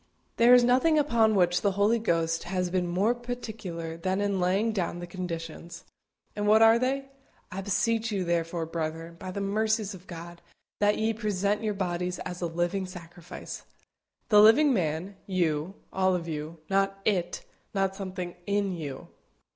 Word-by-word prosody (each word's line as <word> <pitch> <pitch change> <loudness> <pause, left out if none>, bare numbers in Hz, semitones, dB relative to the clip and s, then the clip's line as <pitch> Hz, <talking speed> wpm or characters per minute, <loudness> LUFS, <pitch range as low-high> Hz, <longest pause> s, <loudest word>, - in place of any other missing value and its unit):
There 240 +2 +7
is 245 - +6
nothing 260 +6 +4
upon 230 -7 +3
which 175 -2 +3
the 200 -2 +1
Holy 205 +4 +3
Ghost 165 -6 0
has 180 -1 -1
been 180 -1 0
more 190 +7 +2
particular 220 -9 -6
than 185 +3 -1
in 200 -1 0
laying 195 +5 +2
down 185 -5 -2
the 175 - -6
conditions. 170 -1 -6 0.5
And 205 0 -1
what 220 +1 +6
are 225 +1 +6
they? 270 +2 -1 0.4
"I 190 - -4
beseech 225 +3 0
you, 195 -3 -1
therefore, 170 -1 -1
brethren, 165 +1 -4
by 185 - -6
the 200 +2 -4
mercies 215 +1 0
of 185 0 -13
God, 170 0 -9 0.4
that 205 0 +3
ye 220 +1 +1
present 210 -1 -1
your 215 -2 -1
bodies 180 -1 -2
a 180 - -3
living 175 +3 -1
sacrifice" 175 -1 -9 0.7
the 210 -2 +7
living 260 +7 +6
man 180 0 -2
you, 175 -1 0 0.2
all 190 -1 +2
of 170 -1 -4
you; 155 +1 -5
not 195 +1 +1
it 180 -4 0 0.3
not 195 -1 +1
something 185 -2 -5
in 200 -1 +1
you. 145 -5 -6
190 Hz, 165 wpm, -28 LUFS, 175-215 Hz, 0.7 s, There